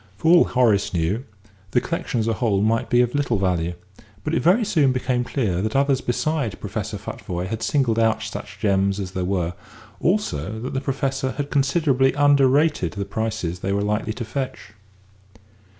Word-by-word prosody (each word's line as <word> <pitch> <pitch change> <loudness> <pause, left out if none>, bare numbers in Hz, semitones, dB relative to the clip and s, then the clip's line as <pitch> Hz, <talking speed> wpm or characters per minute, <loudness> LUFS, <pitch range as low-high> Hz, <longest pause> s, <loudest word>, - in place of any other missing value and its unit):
For 160 +9 +2
all 175 - +6
Horace 110 -7 +2
knew, 90 +10 0 0.4
the 125 - +3
collection 165 -5 -3
as 110 - 0
a 115 - +2
whole 105 -2 +1
might 115 +1 +1
be 120 -1 +4
of 120 -1 0
little 140 -6 +1
value, 90 -3 0 0.5
but - - -2
it - - +2
very 195 - +4
soon 155 -10 +3
became 125 -1 0
clear 105 -9 -1
that 110 +4 -2
others 135 -1 +2
besides 125 - -1
Professor - - -5
Futvoye 90 0 -5
had 110 +3 -4
singled 125 -6 +1
out 115 -1 +2
such - - -7
gems 100 -1 +1
as 95 -2 -4
there 95 -1 -3
were, 90 -2 -1 0.5
also 110 - -1
that 130 - -5
the 135 - -1
Professor 135 -1 -2
had 145 0 -4
considerably 140 -2 +2
under 145 -2 +5
rated 145 - +2
the 100 +1 -4
prices 95 -7 -3
they 95 - -2
were 100 +1 0
likely 105 +1 -1
to 120 - -5
fetch. 130 -2 -5
120 Hz, 180 wpm, -22 LUFS, 100-135 Hz, 0.5 s, all